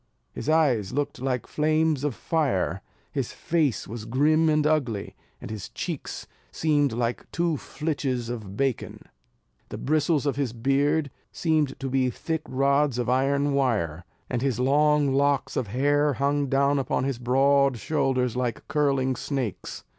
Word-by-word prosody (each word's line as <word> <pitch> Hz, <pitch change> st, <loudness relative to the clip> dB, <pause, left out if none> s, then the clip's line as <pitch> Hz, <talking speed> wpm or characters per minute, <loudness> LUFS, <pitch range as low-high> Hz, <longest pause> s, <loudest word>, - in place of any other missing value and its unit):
His -, -, -4 dB
eyes 135 Hz, -11 st, +2 dB
looked 145 Hz, -2 st, -2 dB
like 130 Hz, -3 st, -1 dB
flames 155 Hz, -1 st, +1 dB
of 145 Hz, -5 st, -1 dB
fire, 95 Hz, -, 0 dB, 0.3 s
his -, -, -3 dB
face 155 Hz, -7 st, 0 dB
was 110 Hz, 0 st, -7 dB
grim 155 Hz, +7 st, +3 dB
and 155 Hz, -1 st, +2 dB
ugly, 130 Hz, -10 st, 0 dB, 0.2 s
and -, -, -8 dB
his 105 Hz, -4 st, -6 dB
cheeks -, -, -5 dB, 0.3 s
seemed 145 Hz, -3 st, +1 dB
like 120 Hz, +1 st, -2 dB
two 170 Hz, -2 st, 0 dB
flitches 140 Hz, -5 st, -3 dB
of 105 Hz, -5 st, -6 dB
bacon; 135 Hz, -4 st, -2 dB, 0.7 s
the -, -, -6 dB
bristles 155 Hz, 0 st, +1 dB
of 140 Hz, -2 st, 0 dB
his 135 Hz, -5 st, -1 dB
beard 140 Hz, +4 st, +1 dB, 0.2 s
seemed 155 Hz, -5 st, 0 dB
to 135 Hz, -, -3 dB
be 130 Hz, -1 st, +1 dB
thick 160 Hz, +5 st, -3 dB
rods 140 Hz, 0 st, +2 dB
of 125 Hz, -1 st, -1 dB
iron 140 Hz, +2 st, +2 dB
wire; 105 Hz, -, 0 dB, 0.2 s
and 120 Hz, -2 st, -2 dB
his 130 Hz, -3 st, 0 dB
long 145 Hz, +1 st, +3 dB
locks 140 Hz, 0 st, +1 dB
of 125 Hz, -, -1 dB
hair 145 Hz, +6 st, +2 dB
hung 140 Hz, +2 st, 0 dB
down 140 Hz, +1 st, +2 dB
upon 130 Hz, -1 st, -1 dB
his 135 Hz, -3 st, -2 dB
broad 135 Hz, +1 st, +3 dB
shoulders 130 Hz, -3 st, 0 dB
like 125 Hz, -2 st, -2 dB
curling 135 Hz, -3 st, +1 dB
snakes. 130 Hz, -4 st, -4 dB
135 Hz, 150 wpm, -26 LUFS, 125-150 Hz, 0.7 s, grim